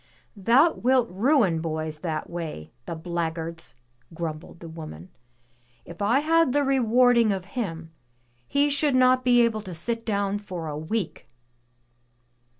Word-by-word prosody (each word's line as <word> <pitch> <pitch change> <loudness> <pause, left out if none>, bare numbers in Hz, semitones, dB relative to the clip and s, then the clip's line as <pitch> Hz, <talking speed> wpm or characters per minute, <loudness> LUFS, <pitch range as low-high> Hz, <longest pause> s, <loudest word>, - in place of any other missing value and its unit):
"Thou 240 - +4
wilt 250 -1 +2
ruin 205 - +2
boys 155 -1 -4
that 155 -2 -3
way, 160 - -6 0.2
the 170 - -4
black 165 0 -3
guards," 165 -2 -7 0.4
grumbled 160 0 -6
the 170 - -9
woman. 155 - -9 0.8
"If 170 +3 -11
I 235 +7 +3
had 325 -3 +3
the 290 0 +2
rewarding 245 -3 +4
of 190 -2 -3
him, 165 -9 -4 0.6
he 285 +1 +2
should 285 -1 +1
not 255 0 +4
be 245 -1 +5
able 225 -2 0
to 185 -4 -8
set 230 +7 -3
down 200 -2 -1
for 180 -5 -6
a 150 - -4
week!" 165 - -4
200 Hz, 145 wpm, -25 LUFS, 165-250 Hz, 0.8 s, be